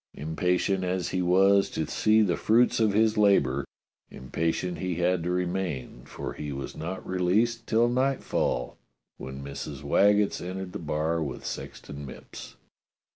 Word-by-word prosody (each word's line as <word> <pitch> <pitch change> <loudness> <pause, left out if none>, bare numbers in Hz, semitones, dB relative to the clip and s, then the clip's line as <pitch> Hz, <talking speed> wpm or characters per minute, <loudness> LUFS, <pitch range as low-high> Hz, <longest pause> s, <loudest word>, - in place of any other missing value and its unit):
Impa 80 +5 0
tient 95 -2 0
as 90 -1 -1
he 95 - -1
was 95 +2 +4
to 80 - -2
see 110 +7 +3
the 90 -4 +1
fruits 115 +3 +3
of 110 -2 +3
his 110 0 +3
labour, 70 -10 +3 0.5
impatient 80 +7 -2
he 90 -2 -2
had 90 +1 +1
to 85 - -2
remain, 90 -9 -3
for - - -6
he 75 -1 -6
was 70 -1 -6
not 85 +4 -5
released 105 +6 +1
till 115 +1 +3
nightfall, 130 - 0 0.4
when 65 +1 -7
Mrs. 70 0 -7
Waggetts 100 +7 +3
entered 95 +1 -5
the - - -4
bar 80 +1 -1
with 70 -5 -5
Sexton 70 0 -7
Mipps. 65 - -10
90 Hz, 150 wpm, -27 LUFS, 75-100 Hz, 0.5 s, was